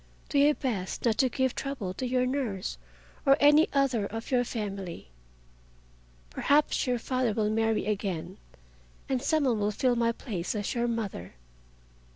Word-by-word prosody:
Do 285 - +2
your 290 +1 +5
best 215 -9 -3
not 225 -2 +2
to 260 - +4
give 260 0 0
trouble 265 -10 -4
to 255 +6 -3
your 250 0 +1
nurse 230 - -2 0.4
or 275 0 +5
any 295 +2 +6
other 270 -7 +1
of 225 +5 -7
your 250 -1 +3
family. 195 - -5 1.2
Perhaps 290 - +2
your 250 -1 +1
father 255 -1 -1
will 210 0 0
marry 225 0 +1
again 190 -3 -3 0.7
and 260 -2 0
some 310 +2 +1
one 240 -5 +1
will 205 0 +1
fill 245 +4 +1
my 230 -1 +2
place 205 -6 -4
as 205 -1 -2
your 240 -1 0
mother. 205 - -4
235 Hz, 160 wpm, -28 LUFS, 205-260 Hz, 1.2 s, any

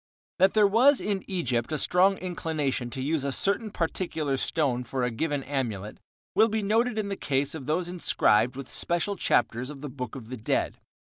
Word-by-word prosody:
That 190 +3 +4
there 210 -1 +6
was 250 +7 +5
in 200 -2 -2
Egypt 130 -10 -1
a 155 - 0
strong 185 +6 +3
inclination 155 -8 -2
to 130 +1 -4
use 150 0 0
a 140 - -1
certain 200 - 0
particular 160 -5 -2
stone 130 -2 0
for 130 0 -3
a 125 - 0
given 145 +3 -2
amulet, 115 -8 -3 0.3
will 220 +1 +5
be 220 0 -1
noted 225 +3 +1
in 210 -2 -1
the 195 - -2
case 140 -5 0
of 145 -5 -7
those 170 +3 0
inscribed 125 -9 +2
with 135 -1 -7
special 175 +4 0
chapters 125 -6 +1
of 145 -2 -9
the 145 - -5
Book 125 -2 -6
of 120 -4 -9
the 130 - -5
Dead. 110 - -1
150 Hz, 195 wpm, -27 LUFS, 130-195 Hz, 0.3 s, there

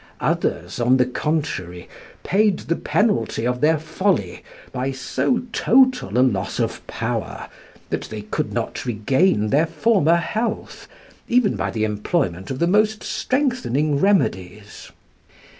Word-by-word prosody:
Others, - - -1
on 125 +2 +4
the 125 - +3
contrary, 125 - -3 0.4
paid 205 0 +2
the 170 - -2
penalty 145 - 0
of 125 0 -1
their 155 +1 +4
folly 155 - -1 0.3
by 130 +1 -2
so 135 - -1
total 255 - +3
a 130 - +5
loss 100 -6 -2
of - - -1
power, - - -4 0.4
that - - -2
they 105 -1 -7
could 105 - -3
not - - -3
regain 120 - +1
their 150 +6 +3
former 165 0 +3
health, 215 +7 -3 0.4
even 240 - +2
by 100 0 -2
the 110 +3 -2
employment 105 - -1
of 130 - -3
the 170 - +1
most 215 +4 +2
strengthening 235 - 0
remedies. 105 - -1
145 Hz, 130 wpm, -21 LUFS, -, 0.4 s, a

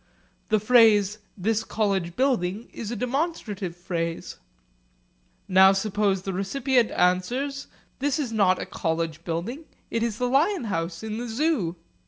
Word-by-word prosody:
The 215 -1 +3
phrase 215 -2 +5 0.2
'this 220 +3 0
college 195 -6 -1
building' 230 -5 0
is 215 - -6
a 240 - -3
demonstrative 240 - -2
phrase. 170 -2 -4 1.1
Now 190 +1 +7
suppose 195 -1 0
the 195 - -3
recipient 240 +5 +1
answers, 245 +11 0 0.3
'This 280 0 0
is 275 -7 -2
not 190 -4 +3
a - - -3
college 165 -1 -3
building, 190 - -4 0.3
it 230 - 0
is 230 -2 -1
the 250 - 0
lion 305 +7 +2
house 165 -3 -3
in 220 0 -4
the 240 - -4
Zoo.' 230 - 0
215 Hz, 140 wpm, -25 LUFS, 185-250 Hz, 1.1 s, Now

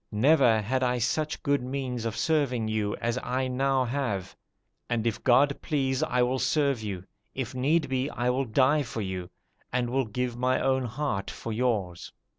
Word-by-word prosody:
Never 125 0 +4
had 130 +5 0
I 125 -1 +1
such 150 +6 -1
good 140 -1 +2
means 125 -2 -3
of 115 -1 -3
serving 135 -8 +1
you 110 -1 -1
as 120 +1 -2
I 130 +1 -1
now 135 +1 +1
have; 115 -8 -2 0.5
and 120 -1 0
if 115 -3 -1
God 140 +3 +4
please, 135 -4 0
I 125 0 +2
will 130 +2 0
serve 140 -5 +1
you; 100 -4 -5 0.3
if 130 -1 -3
need 145 +6 +1
be, 130 +1 -1
I 125 -2 0
will 135 +2 0
die 130 +6 +3
for 115 -4 -4
you, 90 -2 -4 0.4
and 120 -1 0
will 135 0 +1
give 120 +3 -3
my 130 +1 +1
own 130 -1 +1
heart 120 -4 -2
for 115 - -6
yours. 105 -7 -1
125 Hz, 180 wpm, -27 LUFS, 115-135 Hz, 0.5 s, Never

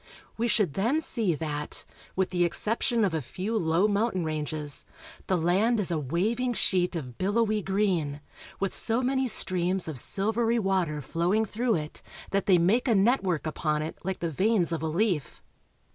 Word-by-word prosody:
We 235 +2 0
should 210 -8 +2
then 235 - +1
see 225 - 0
that, 150 -1 -4 0.3
with 190 0 0
the 175 -1 +2
exception 225 +5 +1
of 185 - -1
a 160 - 0
few 190 - -4
low 175 0 +2
mountain 205 -3 0
ranges, 150 -2 0 0.4
the 185 - +2
land 195 +8 +2
is 185 -3 -1
a 165 - 0
waving 215 - 0
sheet 180 -3 +1
of 130 -7 -6
billowy 215 +2 +1
green, 185 -7 0 0.4
with 195 -1 -1
so 230 +3 +1
many 265 +1 +1
streams 185 -4 +1
of 150 -5 -2
silvery 225 - +1
water 185 -8 0
flowing 180 +9 +1
through 230 +3 0
it 150 -2 -5 0.3
that 200 0 0
they 185 -3 +6
make 210 +10 +2
a 230 - +4
network 195 - +2
upon 155 -1 -1
it 155 - -6
Hke 190 +1 -2
the 170 -1 -3
veins 190 +2 +1
of 165 - -2
a 160 - -1
leaf. 170 -2 -1
190 Hz, 175 wpm, -27 LUFS, 160-220 Hz, 0.4 s, they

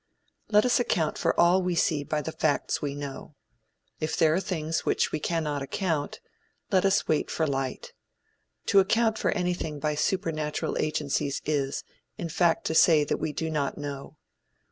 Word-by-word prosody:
Let 210 +1 +4
us 250 0 +3
account 165 -10 0
for - - +1
all 175 +2 +5
we 180 -1 -1
see 160 -4 +1
by 150 +1 -2
the 160 - -4
facts 155 -2 0
we 140 -1 -3
know. 145 +1 -7 0.6
If 155 +1 -2
there 155 -1 +4
are 175 - +2
things 165 -4 -2
for - - -20
which - - +1
we - - -2
cannot 150 -3 -1
account, 150 +1 -2 0.5
let 185 0 +3
us 195 0 +2
wait 155 - +1
for 160 - 0
light. 135 -3 -3 0.8
To 200 - +8
account 220 +3 +2
for - - +1
anything 175 -5 -2
by 150 +1 0
supernatural 155 -2 -1
agencies 150 -2 -1
is, 140 -2 -1 0.3
in 170 - -4
fact 165 +1 +2
to - - 0
say 160 -2 +6
that - - -1
we 155 - -2
do 160 +2 -3
not 145 -3 -1
know. 145 0 -7
155 Hz, 175 wpm, -27 LUFS, 145-175 Hz, 0.8 s, To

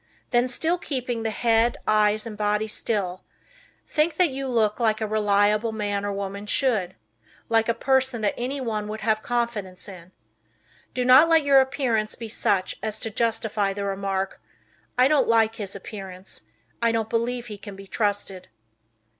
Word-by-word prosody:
Then, 245 0 +3
still 325 +8 +1
keeping 250 -7 -3
the 225 - -1
head, 230 +1 +2
eyes 215 0 +3
and 225 -2 -6
body 210 +1 0
still, 195 -4 -2 0.6
think 310 +2 +1
that 360 -5 +3
you 270 +1 -4
look 225 -3 +1
like 220 -2 +2
a 220 - -1
reliable 210 +1 +2
man 205 -2 -2
or 205 - -1
woman 200 +1 -5
should; 215 -8 +1 0.5
like 225 0 +2
a 230 - +2
person 260 -1 +1
that 205 - +1
anyone 240 -4 -3
would 215 +1 -6
have 215 0 +1
confidence 225 -7 -3
in. 185 -2 -11 0.8
Do 250 -1 0
not 260 +6 +7
let 325 -2 +5
your 275 -1 +6
appearance 260 -5 -1
be 230 -1 -7
such 195 -3 0
as 215 -1 -3
to 225 - -3
justify 220 -3 0
the 200 0 -4
remark, 195 -1 -2 0.6
"I 250 +1 +6
don't 300 0 +3
like 225 -1 +3
his 200 -2 -5
appearance. 190 - -8 0.4
I 230 0 +3
don't 225 -1 -1
believe 235 +1 -1
he 210 -3 -8
can 205 -1 -9
be 195 0 -11
trusted." 200 -2 -2
220 Hz, 165 wpm, -25 LUFS, 205-240 Hz, 0.8 s, not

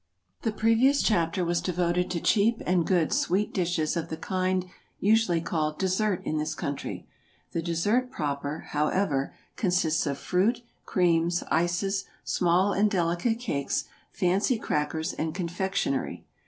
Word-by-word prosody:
The 225 - 0
previous 230 +6 +3
chapter 180 -3 +1
was 170 0 0
devoted 180 0 0
to 175 - -1
cheap 220 +6 +3
and 175 -2 +2
good 175 -4 +2
sweet 195 +4 +1
dishes 170 -4 0
of 170 - -3
the 160 - -4
kind 185 0 -1 0.3
usually 205 -5 +3
called 155 -2 -1
dessert 190 +1 0
in 155 - -1
this 155 +1 -2
country; 140 -2 -4 0.5
the 165 - -1
dessert 205 +10 +1
proper, 145 - -3
however, 150 -2 0 0.2
consists 175 -6 +1
of 140 -1 -1
fruit, 215 - +1 0.2
creams, 175 -2 +2
ices, 180 +4 +1 0.2
small 185 +3 +2
and 210 +2 +3
delicate 175 +4 +1
cakes, 140 - -1 0.3
fancy 195 +6 +1
crackers, 160 -3 -1
and 160 +1 -3
confectionery. 180 -4 -2
180 Hz, 135 wpm, -27 LUFS, 160-200 Hz, 0.5 s, previous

